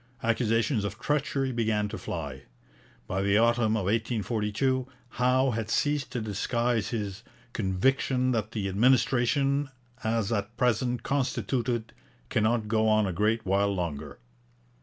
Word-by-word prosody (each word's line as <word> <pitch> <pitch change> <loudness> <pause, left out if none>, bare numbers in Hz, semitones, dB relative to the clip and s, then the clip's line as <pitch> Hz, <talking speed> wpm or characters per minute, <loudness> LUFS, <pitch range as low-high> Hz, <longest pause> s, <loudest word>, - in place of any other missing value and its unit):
Accusations 115 0 +1
of 100 +1 -4
treachery 140 0 0
began 110 -3 0
to 110 - -5
fly. 70 -5 -5 0.6
By 95 - -2
the 100 +1 +3
autumn 115 -1 +3
of 105 - -1
1842 115 +4 0 0.2
Howe 125 +2 +2
had 110 -1 -3
ceased 145 +1 0
to 125 - -2
disguise 110 +1 -1
his 105 -3 -4 0.3
'conviction 125 +6 +1
that 110 -3 -1
the 105 -3 -2
administration, 130 +5 +2 0.3
as 110 -1 0
at 110 +1 -2
present 125 0 +1
constituted, 125 -4 -1 0.4
cannot 110 0 +1
go 110 0 +2
on 110 -1 +4
a 95 - -2
great 110 +5 +1
while 100 +2 +2
longer.' 80 -5 -4
115 Hz, 130 wpm, -28 LUFS, 105-125 Hz, 0.6 s, on